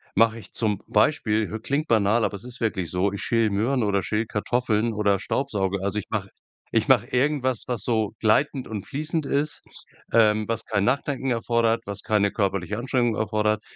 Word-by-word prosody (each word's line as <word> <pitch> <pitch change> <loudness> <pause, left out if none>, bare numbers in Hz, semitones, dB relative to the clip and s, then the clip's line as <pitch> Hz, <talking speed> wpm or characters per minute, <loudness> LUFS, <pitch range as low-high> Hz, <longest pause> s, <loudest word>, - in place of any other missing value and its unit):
mache 115 +2 +3
ich 100 - -11
zum 105 -3 -1
Beispiel 110 -2 +2
h 110 - -3
klingt 140 +7 -1
banal, 110 +1 +3
aber 100 - -2
es 100 - -8
ist 125 0 -9
wirklich 100 -7 -1
so, 95 +2 +1
ich 100 - -5
schäle 115 -2 +2
Möhren 115 +6 0
oder 100 -3 +1
schäle 105 +6 -1
Kartoffeln 115 +1 0
oder 100 -2 +1
staubsauge. 100 -6 -1
Also 100 +2 -1
ich - - -7
mache - - -2 0.5
ich - - +2
mache - - +5
irgendwas, 130 -2 +1
was 120 -5 -2
so 110 -4 0
gleitend 130 +5 +2
und 105 -3 -5
fließend 155 +2 -2
ist, 145 +2 0 0.5
ähm, 110 -2 +4
was 115 0 0
kein 100 -3 0
Nachdenken 135 0 0
erfordert, 115 -1 +1
was 100 0 -5
keine 105 -2 +2
körperliche 100 0 -1
Anstrengung 120 -2 0
erfordert. 105 -1 0
110 Hz, 185 wpm, -24 LUFS, 105-125 Hz, 0.5 s, mache